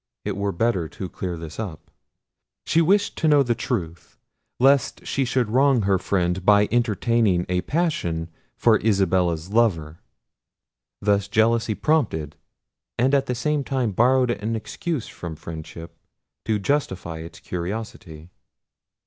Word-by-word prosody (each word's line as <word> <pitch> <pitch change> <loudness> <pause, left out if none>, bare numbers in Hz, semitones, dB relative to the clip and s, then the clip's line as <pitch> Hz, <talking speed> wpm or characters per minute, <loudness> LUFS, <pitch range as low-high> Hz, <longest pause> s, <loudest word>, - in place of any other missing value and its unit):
It - - -2
were 100 +1 -1
better 95 -3 0
to 95 - -6
clear 90 -1 -5
this 80 +2 -8
up. 95 -9 -7 0.7
She 165 - +3
wished 200 +5 +2
to 160 - +1
know 145 -2 +5
the 120 -2 +1
truth, 85 -7 -4 0.4
lest 135 +1 +3
she 135 - 0
should 120 -3 0
wrong 130 -2 +3
her 95 -1 +2
friend 90 -1 -1
by 105 +1 +5
entertaining 115 -5 +1
a 90 0 0
passion 90 - -1 0.3
for 110 -3 +4
Isabella's 95 -4 +1
lover. 85 -9 +1 1.0
Thus 100 -1 +2
jealousy 110 +1 +2
prompted, 100 - 0 0.6
and 130 +4 +2
at 140 -1 +2
the 125 - -1
same 150 +3 0
time 130 -5 -1
borrowed 125 +4 +3
an 110 0 -2
excuse 135 +4 -4
from 85 -2 -7
friendship 80 +1 -9 0.5
to 110 -1 +1
justify 95 - -2
its 80 +1 -10
curiosity. 90 -3 -6
105 Hz, 135 wpm, -23 LUFS, 85-125 Hz, 1.0 s, know